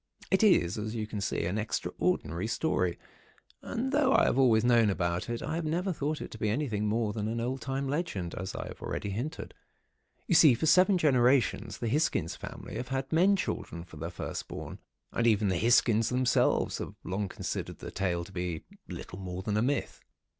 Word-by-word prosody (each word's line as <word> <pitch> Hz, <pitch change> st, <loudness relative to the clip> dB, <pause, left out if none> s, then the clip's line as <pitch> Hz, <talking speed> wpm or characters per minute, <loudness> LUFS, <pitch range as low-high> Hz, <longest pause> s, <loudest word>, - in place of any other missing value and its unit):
"It 190 Hz, -, +4 dB
is, 110 Hz, -, +4 dB
as 110 Hz, +2 st, -4 dB
you 110 Hz, -2 st, -2 dB
can 105 Hz, -1 st, -5 dB
see, 95 Hz, -, -1 dB
an 95 Hz, +5 st, -1 dB
extraordinary 105 Hz, -3 st, -1 dB
story, 90 Hz, -, 0 dB, 0.6 s
and 255 Hz, +3 st, -3 dB
though 280 Hz, -2 st, +3 dB
I -, -, +5 dB
have 135 Hz, -, +2 dB
always 115 Hz, -4 st, +5 dB
known 120 Hz, -3 st, +5 dB
about 85 Hz, 0 st, -1 dB
it, 120 Hz, 0 st, -3 dB
I 155 Hz, -, -3 dB
have 165 Hz, +1 st, -1 dB
never 175 Hz, +5 st, -1 dB
thought 150 Hz, 0 st, -2 dB
it -, -, -7 dB
to 110 Hz, -, -9 dB
be 110 Hz, -, 0 dB
anything 110 Hz, -4 st, -1 dB
more 110 Hz, 0 st, 0 dB
than 110 Hz, +2 st, -2 dB
old 125 Hz, +2 st, -2 dB
time 135 Hz, +3 st, -2 dB
legend, 135 Hz, -, -2 dB
as 95 Hz, +1 st, -5 dB
I -, -, -4 dB
have -, -, -10 dB
already 100 Hz, -, -3 dB
hinted. 130 Hz, -, -5 dB, 0.7 s
You -, -, 0 dB
see, 155 Hz, -6 st, +7 dB
for 125 Hz, -, -2 dB
seven 185 Hz, +5 st, +5 dB
generations 130 Hz, -, +2 dB
the 120 Hz, -, -3 dB
Hisgins 125 Hz, -, 0 dB
family -, -, -8 dB
have 125 Hz, -, -4 dB
had 135 Hz, +1 st, -3 dB
men 185 Hz, +5 st, +5 dB
children 85 Hz, -, -4 dB
for 80 Hz, -3 st, -13 dB
their 80 Hz, +3 st, -4 dB
first 85 Hz, -, -5 dB
born, -, -, -7 dB, 0.3 s
and 115 Hz, -, +1 dB
even 105 Hz, -2 st, +3 dB
the 95 Hz, -, +1 dB
Hisgins 115 Hz, -1 st, +4 dB
themselves 125 Hz, 0 st, +2 dB
have -, -, -6 dB
long 95 Hz, +1 st, -2 dB
considered -, -, -4 dB
the -, -, -8 dB
tale 90 Hz, -3 st, -1 dB
to 90 Hz, -, -12 dB
be 90 Hz, -3 st, -3 dB, 0.2 s
little 90 Hz, -, -8 dB
more 90 Hz, -1 st, -5 dB
than 105 Hz, +1 st, -1 dB
a 105 Hz, -, +2 dB
myth. 135 Hz, +4 st, -1 dB
115 Hz, 200 wpm, -30 LUFS, 95-145 Hz, 0.7 s, see